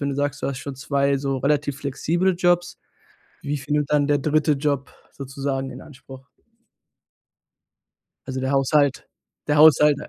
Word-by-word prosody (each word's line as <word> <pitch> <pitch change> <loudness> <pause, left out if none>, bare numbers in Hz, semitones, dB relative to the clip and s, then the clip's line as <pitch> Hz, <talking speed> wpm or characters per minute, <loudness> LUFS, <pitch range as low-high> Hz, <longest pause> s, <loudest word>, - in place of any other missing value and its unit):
wenn 140 - -1
du - - -3
sagst, 145 +1 -2
du - - -1
hast 135 -2 -3
schon 140 -1 -7
2 140 +1 0
so 135 -1 -2
relativ 145 +1 0
flexible 170 +7 0
Jobs, 175 0 +1 0.6
wie 145 +1 -2
viel 140 +2 -6
nimmt 150 -1 0
dann 145 -1 +2
der 145 -1 +2
3. 155 +1 +1
Job 140 -1 -2 0.2
sozusagen 135 0 -4
in 130 +1 -10
Anspruch? 135 -2 -14 2.0
Also 130 -1 -4
der 130 +1 -1
Haushalt 140 0 +1 0.4
der 150 - +2
Haushalt 150 -1 +6
a - - -9
140 Hz, 160 wpm, -22 LUFS, 135-150 Hz, 2.0 s, Haushalt